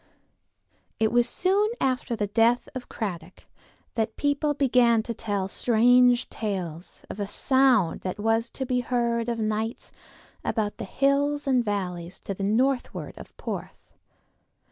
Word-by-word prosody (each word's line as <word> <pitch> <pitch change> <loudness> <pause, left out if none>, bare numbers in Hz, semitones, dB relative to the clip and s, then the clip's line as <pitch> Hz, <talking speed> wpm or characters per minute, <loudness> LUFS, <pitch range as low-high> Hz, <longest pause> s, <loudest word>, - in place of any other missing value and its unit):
It 220 -1 +2
was 240 0 +3
soon 395 +3 +2
after 255 -2 0
the 210 - -1
death 230 +4 +2
of 255 -2 -7
Cradock 180 -5 -6 0.5
that 220 -1 -1
people 290 +1 0
began 240 -5 +3
to 235 - -4
tell 205 -3 -2
strange 245 +3 +4
tales 180 -6 -5
of - - -8
a 200 - -2
sound 250 -5 +2
that 185 +2 -4
was 225 +2 +1
to 265 - -4
be 250 -1 0
heard 235 -1 0
of 235 - -1
nights 220 +1 -2 0.5
about 210 -3 -1
the - - -5
hills 280 +5 +1
and 255 -3 +2
valleys 180 -4 -4
to 195 - -4
the 195 - -8
northward 245 +6 0
of - - -13
Porth. - - -7
235 Hz, 145 wpm, -26 LUFS, 205-255 Hz, 0.5 s, strange